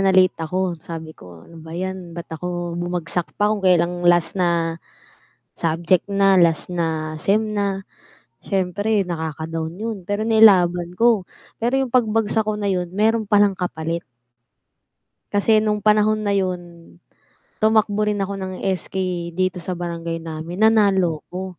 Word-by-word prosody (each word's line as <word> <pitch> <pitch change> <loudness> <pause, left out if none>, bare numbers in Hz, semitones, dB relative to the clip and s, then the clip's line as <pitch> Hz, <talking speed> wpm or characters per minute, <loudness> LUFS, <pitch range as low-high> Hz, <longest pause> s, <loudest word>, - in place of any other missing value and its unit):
na 195 -1 +3
late 185 -1 +5
ako 175 +1 -2
sabi 160 -1 -8
ko 85 - -14
ano 165 -1 -14
ba 160 +1 -10
'yan 185 -2 -5
ba't 170 - -8
ako 175 +1 -4
bumagsak 175 0 -3
pa 210 +1 +2
kung 210 - -2
kailan 175 -1 +2
last 175 -1 +4
na 170 -2 0 0.8
subject 170 +2 +1
na, 195 -1 +3
last 170 -1 +2
na 160 -3 -2
sem 205 +6 +2
na. 200 -1 -1 0.6
Siyempre 200 +2 0
nakaka-down 160 0 -4
'yon 225 0 -3
pero 205 +4 -2
nilaban 180 -6 +5
ko, 230 -4 +4 0.4
pero 240 +4 +1
'yong 265 -3 -2
pagbagsak 220 -2 +2
ko 215 0 -2
na 205 - -1
'yon 180 -3 -1
meron 220 +3 +2
palang 205 -1 +4
kapalit. 170 -2 -3 1.3
Kasi 215 +2 +3
nung 210 -1 -1
panahon 215 0 +3
na 205 - +1
yun 185 -3 0 1.0
tumakbo 215 -1 +2
rin 210 - 0
ako 200 +1 -5
ng 190 0 -4 0.2
SK 185 0 -7 0.4
dito 185 0 0
sa 180 +1 -4
Barangay 170 -1 -4
namin, 165 +4 -5
nanalo 195 -7 +3
ko. 185 0 -7
185 Hz, 145 wpm, -21 LUFS, 170-205 Hz, 1.3 s, late